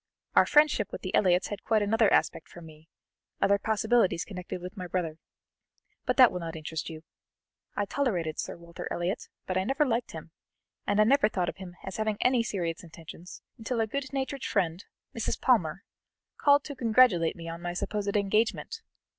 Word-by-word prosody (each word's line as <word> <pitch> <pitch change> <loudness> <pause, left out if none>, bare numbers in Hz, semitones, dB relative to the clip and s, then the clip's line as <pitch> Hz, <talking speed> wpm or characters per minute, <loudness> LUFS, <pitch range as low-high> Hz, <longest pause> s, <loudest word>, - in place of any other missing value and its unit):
Our - - +6
friendship 295 -8 +4
with - - -7
the 185 - -4
Elliots 180 -2 +3
had 205 - -6
quite 220 -2 +2
another 220 +1 +3
aspect - - +1
for - - -12
me, 160 -1 -14 0.5
other 200 0 +3
possibilities 220 -4 +2
connected 180 -2 -6
with 180 +3 -8
my 185 -3 -6
brother 165 -3 -3 0.9
but - - +1
that 255 -3 +8
will 180 - -4
not 165 -1 -5
interest 160 0 -5
you. 160 -1 -9 0.7
I 205 - 0
tolerated 190 - -1
Sir - - -4
Walter 170 0 -8
Elliot, 180 +7 -3 0.2
but 185 0 0
I - - 0
never 270 +8 +1
liked 240 -2 -1
him, 160 0 -9 0.6
and 205 +1 +2
I - - +8
never 245 -1 +4
thought 180 -4 -1
of - - -8
him 185 -2 -9
as 190 - -6
having 215 -1 -1
any 250 -1 +3
serious 175 -8 -3
intentions, 165 +1 -11 0.2
until 230 +1 -2
a 225 - +3
good 265 +4 -4
natured 275 -1 -3
friend, 175 -2 0 0.3
Mrs. 230 - -2
Palmer, 195 -8 +2 0.5
called 285 0 +4
to 285 - -7
congratulate 225 -9 +4
me 165 -2 -9
on 165 +1 -6
my 175 -1 -3
supposed 205 +2 -2
engagement. 215 - 0
200 Hz, 185 wpm, -28 LUFS, 175-230 Hz, 0.9 s, that